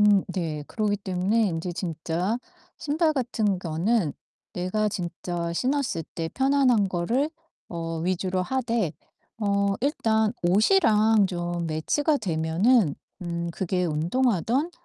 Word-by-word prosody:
음 205 -2 +5
네. 155 -5 -3
그러기 210 -2 0
때문에 200 +2 +1
이제 165 +2 -3
진짜 170 +3 -2 0.4
신발 310 +2 +1
같은 225 -8 0
거는 175 +1 0 0.4
내가 185 +4 0
진짜 175 -2 -4
신었을때 175 - -2
편안한 265 -6 +3
거를 230 - 0 0.4
어 165 -1 -4
위주로 185 +2 -1
하되 230 - -1 0.5
어 200 -2 +1
일단 220 -6 +1
옷이랑 215 - +4
좀 175 -1 -3
매치가 290 - +1
되면은 175 - +2 0.3
음 170 0 -3
그게 180 +1 -1
운동하든 230 - +1
195 Hz, 230 characters per minute, -26 LUFS, 170-230 Hz, 0.5 s, 음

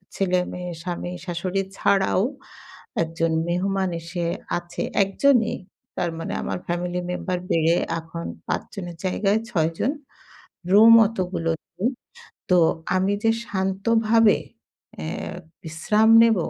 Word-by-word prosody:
ছেলে-মেয়ে, 180 -1 -1
স্বামী, 175 0 -4
শাশুড়ি 180 +2 -2 0.2
ছাড়াও 190 -1 +2 0.8
একজন 165 0 -1 0.2
মেহমান 190 +2 0
এসে 170 +1 -4 0.3
আছে, 175 0 -6 0.2
১ 195 - -4
জনই। 250 -6 +4 0.4
তার 175 -2 0
মানে - - -4
আমার - - -3
ফ্যামিলি 175 +1 -2
মেম্বার 180 0 -2
বেড়ে 165 +1 +3 0.2
এখন 165 +1 -7 0.2
৫ - - -1
জনের 175 -4 -6
জায়গায় 200 +3 +1
৬ 160 -2 +1
জন। 270 - +1 0.8
রুম 220 +3 +8
অতগুলো 185 -6 -2 0.3
নেই। 215 - +1 0.6
তো 180 - +6 0.4
আমি 190 +2 +2
যে 225 - +5 0.2
শান্তভাবে 215 +3 +2 0.7
এ - - -4 0.6
বিশ্রাম 195 +8 +2
নেব 230 -1 +5
185 Hz, 115 wpm, -23 LUFS, 175-200 Hz, 0.8 s, রুম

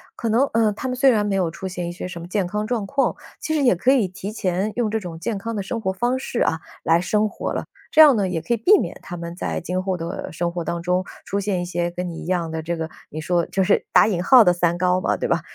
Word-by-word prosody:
可 230 - -3
能， 235 +5 +4
呃， 225 -1 +3
他 240 +5 -5
们 255 - -2
虽 265 +1 +5
然 210 -3 +2
没 200 -1 0
有 180 -4 0
出 190 +3 -6
现 180 -2 -4
一 - - -4
些 175 - -6
什 175 -2 -7
么 170 - -8
健 195 -1 0
康 210 +3 -2
状 225 -2 -1
况， 280 +3 +1 0.3
其 315 - -2
实 305 - +1
也 250 -8 +4
可 250 +9 +2
以 250 -8 +3
提 190 +2 -7
前 190 -1 -1
用 235 -3 +1
这 220 +1 -1
种 170 -3 -7
健 220 +3 -2
康 230 +4 -4
的 210 - -2
生 225 +4 -4
活 190 - 0
方 240 +7 0
式 255 -2 -3
啊， 160 - 0 0.2
来 165 +1 +3
生 210 +3 +1
活 - - -4
了， - - -3 0.3
这 315 - +7
样 295 -4 +8
呢 200 -4 0
也 175 -2 -1
可 165 +9 -1
以 - - +1
避 380 - +5
免 - - -4
他 175 - -7
们 170 0 -6
在 - - -3
今 180 +2 -3
后 185 -1 -1
的 170 +2 -5
生 170 +1 -1
活 175 -1 -3
当 170 +1 -3
中， 180 +2 0 0.2
出 200 +1 -2
现 190 -2 -1
一 - - -3
些 175 0 -2
跟 180 +1 -4
你 165 - -7
一 - - -9
样 175 -3 -1
的 160 0 -3
这 170 +1 -3
个， 160 0 -4 0.2
你 155 - -6
说 170 +1 0
就 190 -1 0
是 - - +2
打 - - +6
引 180 -5 -1
号 250 +2 +7
的 180 - +5
“三 175 0 +1
高” 180 +1 +2
嘛， - - +1
对 - - -2
吧？ - - +1
185 Hz, 320 characters per minute, -22 LUFS, 175-220 Hz, 0.3 s, 样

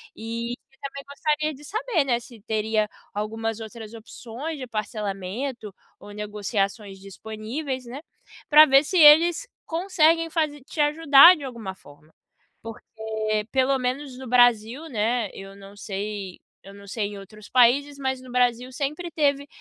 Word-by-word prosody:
e 230 +1 -5 0.3
também 275 0 -7
gostaria 305 +2 -1
de 285 +1 -14
saber, 430 - -1
né, 240 -3 +1
se 235 -2 -15
teria 215 0 -1 0.3
algumas 225 +2 -3
outras 220 0 -9
opções 240 +6 -8
de 260 - -5
parcelamento 215 +1 -5 0.3
ou - - -13
negociações 205 -1 -3
disponíveis, 220 - -6
né, 250 +4 -8 0.5
pra 305 +1 +9
ver 275 0 +5
se 365 +5 -2
eles 330 +8 +7 0.2
conseguem 330 -2 +2
faze 305 -3 -1
te 300 - -10
ajudar 300 +2 +7
de 300 - -10
alguma 230 -8 -7
forma. 150 -2 -19 0.5
Porque 225 +1 -10 0.7
pelo 265 +1 +2
menos 255 +1 -3
no 260 -1 -8
Brasil, 245 +4 +3
né, 225 -3 -1
eu 195 0 -10
não 200 0 -14
sei 200 -1 -6 0.3
eu 195 - -11
não 200 0 -14
sei 205 +1 -3
em 205 -1 -9
outros 210 +2 -13
países, 275 +4 +3
mas 265 -1 -3
no 255 -1 -12
Brasil 250 0 +1
sempre 300 +6 -4
teve 285 -2 0
245 Hz, 145 wpm, -24 LUFS, 215-285 Hz, 0.7 s, pra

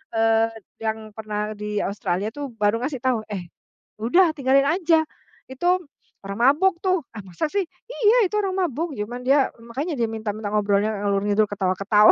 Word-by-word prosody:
eee, 225 0 +3 0.3
yang 220 -1 -3
pernah 210 -1 -3
di 210 0 -3
Australia 200 0 -2
tuh 285 -1 -6
baru 210 +1 +2
ngasih 270 -1 -2
tahu, 245 -4 +1
"Eh, 185 -5 -6 0.5
udah 340 +11 +4
tinggalin 275 -1 +4
aja. 330 -1 +3 0.5
Itu 350 +8 +1 0.4
orang 200 +2 -5
mabuk 350 +1 +1
tuh." 370 -5 +2
"Ah, 210 - -7
masa 185 - -3
sih?" 400 -1 +1 0.2
"Iya. 460 -3 +3
Itu 420 - -5
orang 380 -1 -1
mabuk, 315 +4 -3
cuman 240 +4 -5
dia 270 +1 +4 0.2
makanya 280 +8 -3
dia 230 - +2
minta 220 -1 -3
minta 210 -1 -4
ngobrolnya 205 0 +2
ngalor-ngidul 205 +1 +2
ketawa-ketawa." 200 +2 +4
225 Hz, 165 wpm, -23 LUFS, 210-310 Hz, 0.5 s, udah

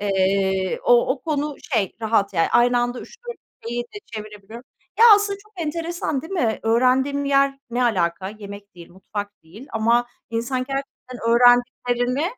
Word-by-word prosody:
Eee, 190 -1 0
o 240 0 +4
o 260 - -10
konu 295 -1 -2 0.2
şey, 210 -6 +1
rahat 215 -3 +1
yani. 165 -1 +2
Aynı 245 +1 +4
anda 245 +1 -2
3-4 480 0 -10 0.3
şeyi 240 +1 -2
de 240 +12 -11
çevirebiliyorum. 215 +2 -9 0.3
Ya, 455 - +7
aslında 405 -1 -2
çok 425 +1 -26
enteresan 330 -3 -3
değil 325 - -9
mi? 240 - 0
Öğrendiğim 255 +5 +2
yer 275 0 +2
ne 245 +2 0
alaka? 185 -5 0
Yemek 200 -1 -10
değil, 170 -1 -13
mutfak 205 +3 -7
değil 200 +11 -13
ama 235 +2 +2 0.2
insan 235 +3 -2
gerçekten 270 -2 -6
öğrendiklerini 245 +2 +3
240 Hz, 150 wpm, -22 LUFS, 205-275 Hz, 0.3 s, Ya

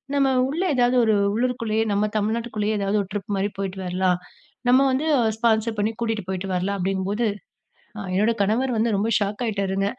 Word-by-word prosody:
நம்ம 275 -1 +3 0.2
உள்ள 325 +6 -2
ஏதாவது 245 0 +3
ஒரு 220 - +3 0.2
உள்ளூருக்குள்ளேயே, 230 -2 0
நம்ம 205 +1 +1
தமிழ்நாட்டுக்குள்ளேயே 220 0 -1
ஏதாவது 200 +1 +1
ஒரு - - -12
ட்ரிப் 205 -1 -4
மாரி 200 +2 0
போயிட்டு 195 -1 -4
வரலாம். 180 0 +1 0.5
நம்ம 255 +2 +6
வந்து 270 +4 0 0.3
ஸ்பான்சர் 220 -1 +1
பண்ணி 215 +2 +1
கூட்டிட்டு 225 -3 -1
போயிட்டு 190 0 -3
வரலாம் 195 +3 -1
அப்டிங்கும்போது," 195 +4 -1 0.9
என்னோட 215 +4 +3
கணவர் 235 +5 +1
வந்து 225 -1 +1
ரொம்ப 215 +3 0
ஷாக் 205 +4 -2
ஆயிட்டார்ங்க. 195 -2 -1
210 Hz, 160 wpm, -23 LUFS, 195-230 Hz, 0.9 s, நம்ம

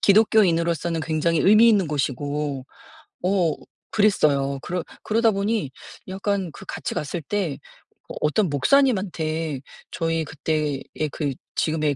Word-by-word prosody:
기독교인으로서는 170 -6 +3
굉장히 160 0 +1
의미 215 +4 +7
있는 200 -6 +4
곳이고 145 -1 -2 0.6
어 180 -4 +2 0.4
그랬어요. 145 -10 +2
그러 180 -1 -3 0.2
그러다 225 +1 +3
보니 200 - -1 0.4
약간 195 -1 -2
그 - - -11
같이 160 - -4
갔을 155 +3 -3
때 175 -3 -2 0.5
어 - - -7
어떤 175 +6 +2
목사님한테 165 - +1 0.3
저희 165 -1 -1
그때의 150 -1 -2 0.3
그 145 -4 -2 0.2
지금의 155 -2 +1
165 Hz, 275 characters per minute, -23 LUFS, 150-200 Hz, 0.6 s, 의미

